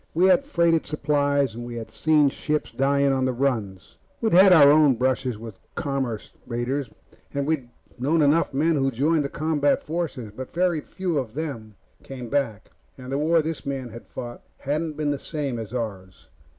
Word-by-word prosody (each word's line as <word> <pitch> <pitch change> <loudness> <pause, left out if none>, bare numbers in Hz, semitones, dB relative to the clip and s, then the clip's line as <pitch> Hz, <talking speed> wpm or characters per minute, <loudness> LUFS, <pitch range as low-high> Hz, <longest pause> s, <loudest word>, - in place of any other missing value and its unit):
We 175 +3 +4
had 235 +9 +4
freighted 170 - +2
supplies, 145 -3 +1
and 120 +1 -7
we 120 0 -7
had 115 -1 -7
seen 150 -2 +3
ships 150 +2 -2
dying 140 +1 +2
on 130 -1 +1
the 130 - +1
runs 115 -8 -2 0.2
we'd 225 -4 0
had 190 +2 +8
our 145 -5 +8
own 150 -3 +5
brushes 130 -1 0
with 110 -2 -10 0.2
commerce 135 -6 -3
raiders, 125 +2 -2 0.5
and 140 0 0
we'd 140 -5 -1 0.3
known 150 +5 +2
enough 150 +4 +3
men 155 +3 +2
who 135 -1 +2
joined 145 +5 +1
the 140 - -3
combat 150 -1 +1
forces. 150 -9 -4
But 130 +8 -9
very 175 -3 +1
few 175 -1 -2
of 120 -3 -6
the 155 - -1
men 110 -9 -7 0.3
came 125 -3 -8
back, 115 -7 -2 0.3
and 130 0 -9
the 135 - 0
war 160 +1 +3
this 160 0 -4
man 135 -3 -4
had 115 +1 -11
fought 120 -1 -7 0.2
hadn't 155 +3 -2
been 150 -1 0
the 145 - -2
same 140 -7 -4
as 110 -2 -7
ours. 95 -8 -6
140 Hz, 190 wpm, -24 LUFS, 120-155 Hz, 0.5 s, had